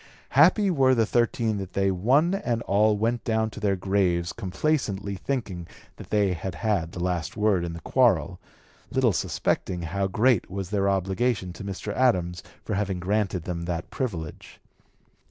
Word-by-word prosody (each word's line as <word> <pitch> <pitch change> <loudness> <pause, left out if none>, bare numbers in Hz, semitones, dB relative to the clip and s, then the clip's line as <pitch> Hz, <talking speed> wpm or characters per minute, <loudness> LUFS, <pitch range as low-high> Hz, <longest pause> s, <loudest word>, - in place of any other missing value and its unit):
Happy 185 - +5
were 135 -5 +4
the 115 -2 +3
thirteen 115 -2 +1
that 95 -2 -7
they 95 0 +2
one 130 - +2
and 120 - -1
all 105 +2 +3
went 115 +3 0
down 110 -1 0
to - - -9
their 100 -2 +1
graves 90 -2 0
complaisantly 100 -2 -1
thinking 100 -6 -4 0.3
that - - -11
they 100 -3 +2
had 90 +1 -5
had 100 -7 -1
the - - -6
last 85 -3 -2
word 105 -4 +2
in 85 -1 -4
the 85 - -7
quarrel, - - +2 0.5
little - - +2
suspecting 90 -2 -1
how 95 +4 -1
great 110 +2 +2
was 95 0 -5
their 100 -1 +1
obligation 95 +1 0
to 85 - -9
Mr. 100 +1 -5
Adams 90 -9 +1 0.2
for 110 - -3
having 100 -2 -1
granted 95 -1 -1
them 85 -1 -4
that 85 +1 -4
privilege. 90 - -5
100 Hz, 165 wpm, -26 LUFS, 90-115 Hz, 0.5 s, Happy